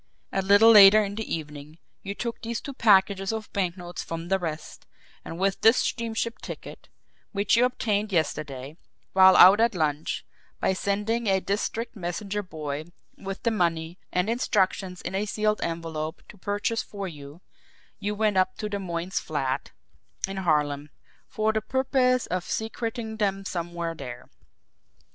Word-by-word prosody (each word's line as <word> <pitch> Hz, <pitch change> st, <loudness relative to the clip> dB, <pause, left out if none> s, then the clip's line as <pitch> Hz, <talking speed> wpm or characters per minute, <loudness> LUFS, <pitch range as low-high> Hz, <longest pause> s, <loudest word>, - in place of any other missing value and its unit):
A 195 Hz, -, 0 dB
little 205 Hz, +4 st, +7 dB
later 210 Hz, 0 st, +9 dB
in 200 Hz, -1 st, -4 dB
the 220 Hz, +1 st, -5 dB
evening, 150 Hz, -1 st, -6 dB, 0.2 s
you 200 Hz, 0 st, -5 dB
took 235 Hz, +1 st, -4 dB
these 230 Hz, 0 st, -3 dB
two 280 Hz, -, -7 dB
packages 195 Hz, -4 st, +3 dB
of 220 Hz, -1 st, -6 dB
banknotes 180 Hz, -2 st, -3 dB
from 165 Hz, +1 st, -6 dB
the 195 Hz, 0 st, +2 dB
rest, 160 Hz, -3 st, -6 dB, 0.4 s
and 165 Hz, -, -7 dB
with 195 Hz, +1 st, 0 dB
this 225 Hz, +3 st, +6 dB
steamship 230 Hz, 0 st, -2 dB
ticket -, -, -9 dB, 0.4 s
which 200 Hz, +2 st, +2 dB
you 240 Hz, +2 st, +5 dB
obtained 215 Hz, -4 st, -1 dB
yesterday 150 Hz, -4 st, -2 dB, 0.4 s
while 190 Hz, -1 st, +7 dB
out 195 Hz, +4 st, +9 dB
at 230 Hz, -2 st, +3 dB
lunch 155 Hz, -2 st, -1 dB, 0.3 s
by -, -, +1 dB
sending 210 Hz, +4 st, -1 dB
a 190 Hz, -1 st, +3 dB
district 210 Hz, +5 st, -3 dB
messenger 200 Hz, +2 st, -3 dB
boy 155 Hz, -5 st, -5 dB, 0.3 s
with 195 Hz, 0 st, -7 dB
the 230 Hz, -, +2 dB
money 170 Hz, -3 st, -1 dB
and 180 Hz, +2 st, +1 dB
instructions 195 Hz, -5 st, 0 dB
in 180 Hz, -, -4 dB
a 200 Hz, +2 st, -1 dB
sealed 215 Hz, 0 st, 0 dB
envelope 165 Hz, -2 st, -4 dB
to -, -, -12 dB
purchase 205 Hz, +3 st, -1 dB
for 200 Hz, -2 st, -6 dB
you 145 Hz, 0 st, -11 dB, 0.6 s
you 210 Hz, 0 st, -2 dB
went 210 Hz, -2 st, +1 dB
up 185 Hz, 0 st, +2 dB
to 210 Hz, -, -3 dB
the 205 Hz, -1 st, -3 dB
Moynes' 175 Hz, 0 st, -3 dB
flat 135 Hz, -4 st, -3 dB, 0.6 s
in 195 Hz, 0 st, -6 dB
Harlem 150 Hz, -5 st, 0 dB, 0.4 s
for 220 Hz, -2 st, 0 dB
the 220 Hz, -, 0 dB
purpose 255 Hz, +1 st, +1 dB
of 180 Hz, -1 st, -2 dB
secreting 225 Hz, +1 st, -4 dB
them 195 Hz, -2 st, -1 dB
somewhere 170 Hz, -2 st, -3 dB
there. 125 Hz, -5 st, -9 dB
195 Hz, 155 wpm, -26 LUFS, 170-215 Hz, 0.6 s, later